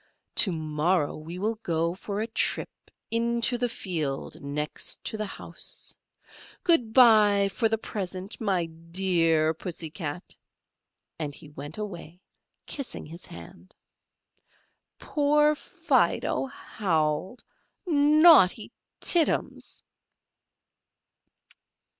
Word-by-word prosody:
To 195 - +5
morrow 155 0 0
we 160 +3 -8
will 215 +3 -2
go 165 -2 0
for 200 +2 -4
a - - 0
trip 225 - -2 0.2
into 235 +1 +1
the 245 0 0
field 160 -11 -4
next 145 +1 -3
to - - -2
the 215 -1 -3
house. - - -6 0.7
Good 250 - +3
by 210 -5 +6
for 225 +3 0
the 225 - +1
present, 190 -1 -6
my 190 -5 +1
dear 165 -1 +1
Pussy 165 -1 -6
Cat;" 165 0 -5 0.8
and 145 -3 -4
he 150 - -12
went 145 +1 -8
away 180 -5 -7 0.5
kissing 275 -3 -6
his 170 +3 -10
hand. 85 +1 -13 1.2
Poor 295 +1 +2
Fido 285 - 0
howled. 185 - -2 0.4
Naughty 300 - +5 0.3
Tittums! 340 -3 +2
190 Hz, 100 wpm, -27 LUFS, 160-230 Hz, 1.2 s, by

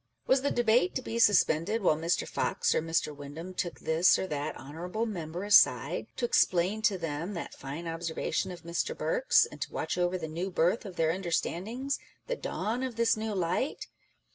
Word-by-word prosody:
Was 260 0 +3
the 285 - +1
debate 240 +9 +2
to 260 - -2
be 230 -1 -3
suspended 205 0 +3
while 155 - +4
Mr. 165 +3 0
Fox - - 0
or - - +1
Mr. 165 -2 -1
Windham 145 +6 -8
took 175 -2 -3
this 165 +3 +4
or - - -2
that 150 -5 -3
Honourable 175 - -4
Member 175 -4 -5
aside, 205 0 +4
to - - -1
explain 200 - +2
to 205 -3 +2
them 165 +3 -4
that 170 - -5
fine 145 +5 -7
observation 165 +3 -2
of 175 - -10
Mr. 170 - -2
Burke's, - - +3
and - - -12
to - - -3
watch - - -2
over 175 +1 +1
the 160 -3 -5
new 170 +5 -3
birth 180 +5 +1
of 190 -3 -8
their 160 -1 +2
understandings, 195 +8 -2 0.3
the - - -2
dawn 235 - -3
of 260 -3 -3
this 230 0 +3
new 215 -1 -3
light 185 - -1
180 Hz, 190 wpm, -29 LUFS, 165-225 Hz, 0.3 s, while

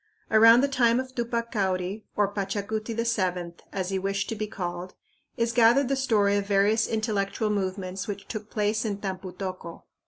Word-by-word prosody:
Around 230 +2 +8
the 275 -1 -1
name 235 +1 +5
of 260 0 -5
Tupac 235 -1 -2
Cauri, 190 0 -1
or 205 -1 +1
Pachacuti 210 +3 -3
VII, 185 -7 -1
as 185 -2 -3
he 195 -1 -1
wished 195 +1 -2
to 225 - -2
be 215 0 -3
called, 180 -3 -5 0.4
is 230 -1 0
gathered 240 +3 +5
the 275 - +2
story 215 -7 +2
of 200 0 -2
various 205 +2 +3
intellectual 215 -1 -1
movements 190 -1 -3
which 200 -1 -6
took 215 -1 -6
place 210 +1 0
in 210 -3 -2
Tampu 190 -2 -5
tocco. 185 -3 -6
205 Hz, 175 wpm, -26 LUFS, 195-230 Hz, 0.4 s, Around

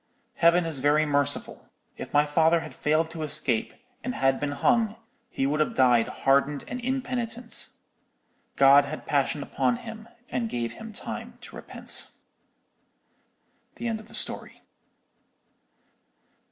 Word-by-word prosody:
Heaven 170 0 +4
is 160 -4 -2
very 145 +3 +3
merciful. 145 -1 -1 0.3
If - - -8
my 145 0 +4
father 160 +2 +3
had - - -9
failed 155 +2 +1
to 165 - -7
escape, 135 -6 0 0.3
and 255 - -3
had 135 0 +2
been 145 - -1
hung, 225 - +2 0.3
he 135 - -1
would 150 +2 0
have 155 - 0
died 125 -3 +4
hardened 140 +1 +1
and 250 - -5
impenitent. 245 -2 -3 0.9
God 140 +1 +7
had 155 +2 -6
compassion 145 0 0
on 245 - +3
him, 225 -2 -9 0.2
and 235 -2 -2
gave 120 - -2
him 225 0 -9
time 210 - -7
to - - -11
repent.'" - - -4 1.7
_(The 235 - -4
end 225 -1 -2
of 215 - -14
the - - -7
story.) - - -1
155 Hz, 140 wpm, -26 LUFS, 140-225 Hz, 1.7 s, God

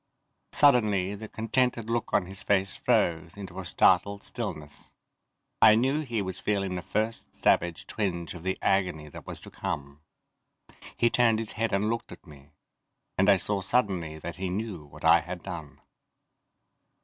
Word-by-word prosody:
Suddenly 105 -9 +4
the 110 +2 -7
contented 115 +1 0
look 115 0 -1
on - - +2
his 95 +1 -8
face 95 -1 +1
froze 85 +1 0
into 95 -2 -7
a 95 - -5
startled 100 +5 +3
stillness. 75 -1 -6 0.7
I 110 - +8
knew 135 +6 +2
he 120 -8 -2
was 95 -1 -5
feeling 100 -3 -1
the 90 - -3
first 110 +4 -3
savage 85 -2 +1
twinge 85 -6 -3
of 85 - -9
the 95 +2 -2
agony 90 -6 +1
that - - -11
was - - -6
to - - -12
come. 70 0 -5 1.0
He 120 - +3
turned 115 -3 +4
his 110 -1 -3
head 115 +1 -1
and 100 +2 +1
looked 115 - -4
at - - -12
me, 70 -3 -15 0.7
and 95 +2 +3
I 100 - +7
saw 100 +2 0
suddenly 95 -8 0
that 85 +3 -7
he 95 0 -3
knew 95 -4 -4
what 70 - -11
I - - +7
had - - -7
done. - - -8
95 Hz, 165 wpm, -28 LUFS, 85-110 Hz, 1.0 s, I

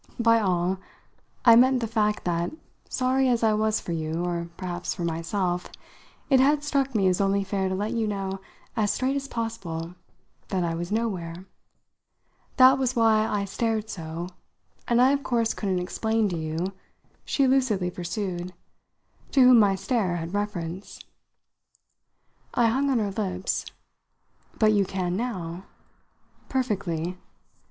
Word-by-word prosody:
By 230 -1 +5
'all' 185 -2 0 0.7
I 230 -2 +9
meant 255 +2 +5
the 235 - -1
fact 215 -2 0
that, 170 -1 0 0.4
sorry 260 +1 +2
as 235 -2 +1
I 220 -1 +4
was 215 0 +1
for - - -6
you 160 +1 -2
or 170 -1 -3
perhaps 180 -2 -4
for 175 - -4
myself 175 +2 -1 0.6
it 265 -2 +5
had 290 +3 +3
struck 275 -3 0
me 195 -3 +3
as 185 +1 +2
only 195 0 +2
fair 195 -1 -1
to 190 - -1
let 205 +3 -2
you 230 -2 0
know 195 -2 -3 0.4
as 210 -2 +1
straight 265 +2 0
as 275 0 -3
possible 190 -9 -4 0.5
that 185 -2 -1
I 170 -1 -1
was 175 +3 -4
nowhere. 185 -6 -2 1.1
That 260 0 +7
was 255 -1 0
why 220 -2 +4
I 205 -1 -1
stared 220 +1 -2
so, 165 0 -5 0.6
and 240 0 +3
I 255 +2 +6
of 280 0 +1
course 230 -4 0
couldn't 195 -3 -1
explain 220 +4 0
to 175 - -3
you," 160 +4 -3 0.5
she 275 - +1
lucidly 235 -9 +2
pursued, 180 0 -4 0.8
"to 275 - +5
whom 250 -2 +8
my 200 -2 +4
stare 195 -2 0
had 165 +1 -5
reference." 195 -3 -4 1.6
I 240 - +4
hung 270 +5 +1
on 265 - +2
her 210 -3 0
lips. 190 -2 -2 0.9
"But 215 -1 +4
you 205 -1 +4
can 180 -2 -2
now?" 185 -6 -4 0.8
"Perfectly. 185 - -2
200 Hz, 150 wpm, -26 LUFS, 180-230 Hz, 1.6 s, I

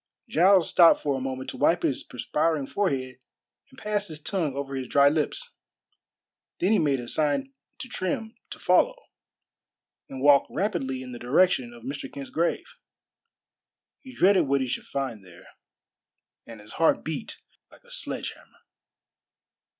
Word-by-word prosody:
Giles 190 -3 +4
stopped 170 -2 +5
for 145 -2 0
a 135 - -4
moment 130 0 -4
to - - -10
wipe 170 +4 +2
his 135 - 0
perspiring 150 +4 -1
forehead 135 -9 -2 0.5
and 265 - -20
pass 210 -2 -2
his 155 -3 -8
tongue 155 -4 -2
over 140 0 -4
his 130 -2 -4
dry 140 +2 +5
lips, 160 - -2 1.0
then 185 - +1
he 220 - +4
made 140 -4 +1
a 120 - -7
sign 155 - 0 0.2
to 255 - -7
Trim 225 +1 -3 0.2
to - - -8
follow, - - +3 1.1
and 135 0 -7
walked 145 -1 +6
rapidly 135 -11 -2
in 125 - -9
the 120 - -8
direction 130 -1 +2
of 120 -1 -14
Mr. 140 +3 -6
Kent's 140 -1 -8
grave. 170 +1 0 1.3
He 260 - -12
dreaded 185 -4 +4
what 140 0 +2
he 130 - -1
should 125 - -4
find 130 -7 -4
there, 90 -2 -16 1.0
and 115 -2 -10
his 105 - -13
heart 165 - +3
beat 160 +7 -5 0.3
like - - -20
a 485 - -19
sledge - - -3
hammer. - - -20
145 Hz, 160 wpm, -26 LUFS, 130-185 Hz, 1.3 s, walked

